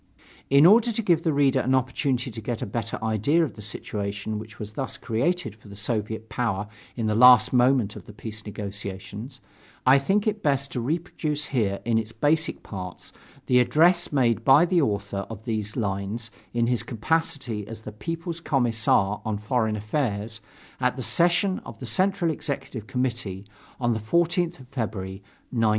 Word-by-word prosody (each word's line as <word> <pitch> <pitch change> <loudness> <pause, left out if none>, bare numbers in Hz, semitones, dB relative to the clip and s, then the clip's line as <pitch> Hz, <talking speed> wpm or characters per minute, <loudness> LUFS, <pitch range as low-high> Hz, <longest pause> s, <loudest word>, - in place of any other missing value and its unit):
In 140 +3 +6
order 225 +5 +6
to 230 - -1
give 170 -5 +3
the 165 - +1
reader 140 -2 +3
an 130 +1 +2
opportunity 130 -1 0
to 110 - -7
get 115 +1 -3
a - - -1
better 110 +1 -3
idea 110 +10 +2
of 145 - -7
the 105 - -11
situation 105 0 -4
which 110 -1 -10
was 105 0 -7
thus 130 +3 -4
created 120 - -1
for 105 0 -18
the 100 - -10
Soviet 110 +1 -3
power 105 -5 -1 0.3
in 115 - -2
the 110 - +1
last 125 +2 +7
moment 125 -4 +3
of - - -10
the - - -9
peace 105 0 -6
negotiations, 105 +4 -6 0.4
I 130 +2 +7
think 195 +9 +1
it 215 -1 0
best 140 -3 0
to 125 - -2
reproduce 150 +1 -2
here 105 -8 -1
in 115 -1 +2
its 110 0 -5
basic 150 +7 +1
parts 90 -3 -8 0.3
the 125 - +4
address 175 +7 +4
made 120 -5 +2
by 135 +7 +7
the 175 -1 +2
author 100 -5 -2
of 110 -1 -9
these 110 -3 -2
lines 105 +1 -3 0.2
in 120 0 +1
his 120 -1 +1
capacity 120 -2 -1
as 115 -1 -8
the 105 - -8
People's 165 - -5
Commissar 115 -8 +2
on 110 -2 -2
Foreign 110 +1 0
Affairs 110 -1 -2 0.4
at 125 -1 +1
the 130 - -4
session 180 +5 +3
of - - -10
the - - -7
Central 190 -3 +1
Executive 135 -7 -5
Committee 120 -7 -2 0.3
on 120 -2 +1
the 110 - -2
14th 170 - +1
of 130 - -13
February, 105 -7 -4 0.3
1918. 115 -3 +2
120 Hz, 175 wpm, -25 LUFS, 105-145 Hz, 0.4 s, last